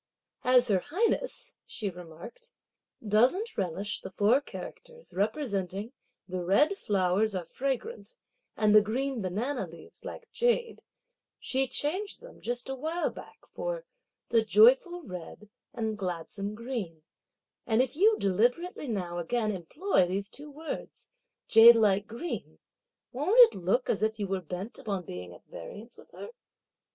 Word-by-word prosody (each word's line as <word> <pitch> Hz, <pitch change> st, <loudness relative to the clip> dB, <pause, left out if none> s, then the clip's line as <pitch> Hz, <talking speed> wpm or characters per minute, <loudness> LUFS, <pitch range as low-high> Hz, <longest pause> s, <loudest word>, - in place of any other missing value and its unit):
"As 250 Hz, 0 st, +5 dB
her 195 Hz, -3 st, +4 dB
highness," 470 Hz, -, -1 dB
she 215 Hz, -, -4 dB
remarked, 175 Hz, -, -11 dB, 0.6 s
"doesn't 260 Hz, -, +3 dB
relish 195 Hz, +2 st, -2 dB
the -, -, -7 dB
four 210 Hz, +8 st, +3 dB
characters, 485 Hz, +10 st, -10 dB
representing 205 Hz, -, -2 dB, 0.3 s
the 185 Hz, -1 st, -3 dB
red 280 Hz, -, +3 dB
(flowers 200 Hz, -, +1 dB
are) 180 Hz, -2 st, -3 dB
fragrant, 275 Hz, -, -4 dB, 0.4 s
and 215 Hz, -1 st, +4 dB
the 215 Hz, -, +9 dB
green 250 Hz, +4 st, -2 dB
(banana 205 Hz, +4 st, -2 dB
leaves) 165 Hz, 0 st, -13 dB
like 470 Hz, -, -8 dB
jade, 475 Hz, 0 st, 0 dB, 0.6 s
she 265 Hz, 0 st, 0 dB
changed 370 Hz, +11 st, -2 dB
them, -, -, -14 dB
just 245 Hz, +1 st, -3 dB
a 270 Hz, -, -3 dB
while 320 Hz, +6 st, -2 dB
back, -, -, -13 dB
for -, -, -4 dB, 0.4 s
'the 230 Hz, -1 st, +4 dB
joyful 260 Hz, -, +5 dB
red 185 Hz, -, -9 dB, 0.2 s
and 220 Hz, -3 st, -3 dB
gladsome 195 Hz, +3 st, -4 dB
green;' 215 Hz, -10 st, -5 dB, 0.6 s
and 225 Hz, +2 st, +4 dB
if 265 Hz, -, -5 dB
you 425 Hz, +6 st, +5 dB
deliberately 245 Hz, -, 0 dB
now 180 Hz, -6 st, -3 dB
again 215 Hz, +5 st, 0 dB
employ 190 Hz, -, +1 dB
these 195 Hz, +4 st, -3 dB
two 295 Hz, +1 st, -8 dB
words 305 Hz, +2 st, -7 dB, 0.4 s
'jade 230 Hz, +1 st, +9 dB
like 205 Hz, -2 st, +3 dB
green,' 240 Hz, +10 st, -6 dB, 0.5 s
won't 440 Hz, -, +6 dB
it -, -, -11 dB
look 190 Hz, +8 st, 0 dB
as 205 Hz, -, 0 dB
if 220 Hz, 0 st, +1 dB
you 205 Hz, -, 0 dB
were 190 Hz, -1 st, -2 dB
bent 180 Hz, +6 st, -7 dB
upon 195 Hz, -5 st, -3 dB
being 90 Hz, -, -7 dB
at 85 Hz, -, -15 dB
variance 205 Hz, -, -10 dB
with -, -, -17 dB
her? -, -, -9 dB
225 Hz, 145 wpm, -29 LUFS, 195-295 Hz, 0.6 s, the